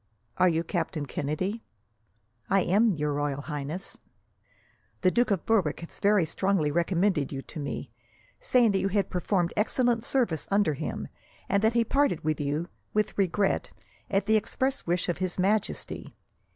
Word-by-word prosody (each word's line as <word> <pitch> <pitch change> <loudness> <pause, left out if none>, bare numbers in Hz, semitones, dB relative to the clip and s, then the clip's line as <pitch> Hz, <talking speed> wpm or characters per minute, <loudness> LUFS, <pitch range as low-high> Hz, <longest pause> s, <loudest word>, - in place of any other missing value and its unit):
"Are 185 - +5
you 165 0 0
Captain 165 -3 -2
Kennedy?" 185 +11 -3 0.9
"I 195 0 +4
am, 205 +3 +3
Your 150 -1 -1
Royal 145 -1 -1
Highness." 150 +5 -5 1.0
"The 185 - +4
Duke 240 +4 +2
of 195 -5 0
Berwick 190 -10 +1
has 170 - -10
very 200 -3 +4
strongly 185 -2 +1
recommended 170 -2 +1
you 135 -1 -5
to - - -8
me, 140 -3 -5 0.5
saying 240 -4 +3
that 195 - +1
you 190 - +1
had 195 0 0
performed 180 -1 0
excellent 235 +2 +1
service 230 - 0
under 200 -5 +3
him, 150 +2 -4 0.4
and 200 0 +2
that 220 +1 +4
he 235 0 +3
parted 275 - +1
with 155 -1 0
you, 145 +4 -1 0.3
with 215 0 +1
regret, 195 0 +1 0.4
at 195 0 +1
the 220 0 +4
express 260 +4 -2
wish 175 +1 +1
of 175 -1 -1
His 185 -1 -2
Majesty. 200 +3 -1
185 Hz, 160 wpm, -28 LUFS, 155-210 Hz, 1.0 s, Are